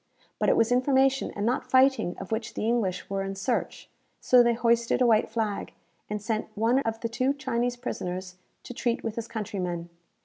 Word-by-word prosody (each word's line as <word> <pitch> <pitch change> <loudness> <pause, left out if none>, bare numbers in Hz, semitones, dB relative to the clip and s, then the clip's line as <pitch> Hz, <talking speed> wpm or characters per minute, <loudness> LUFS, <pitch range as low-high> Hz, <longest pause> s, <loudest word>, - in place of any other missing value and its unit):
But - - +2
it - - +3
was 225 +1 +3
information 265 +1 +3
and 205 - -2
not 245 +3 -1
fighting 260 -8 +3
of 195 - -8
which 220 0 -3
the - - -2
English 215 -6 0
were 195 0 -2
in 195 0 -4
search; 210 +5 -2 0.3
so 250 -1 +5
they 235 -1 +3
hoisted 235 0 +2
a 250 - +4
white 225 -1 +3
flag, 220 -2 -3 0.4
and 210 0 -2
sent 215 +1 -2
one 230 +4 +3
of 225 -4 -2
the 230 - -1
two 255 +4 0
Chinese 245 -3 -1
prisoners 185 -5 -5 0.3
to - - -8
treat 240 -1 -1
with 225 - -2
his 230 -1 -4
countrymen. 180 -6 -4
230 Hz, 195 wpm, -27 LUFS, 205-245 Hz, 0.4 s, so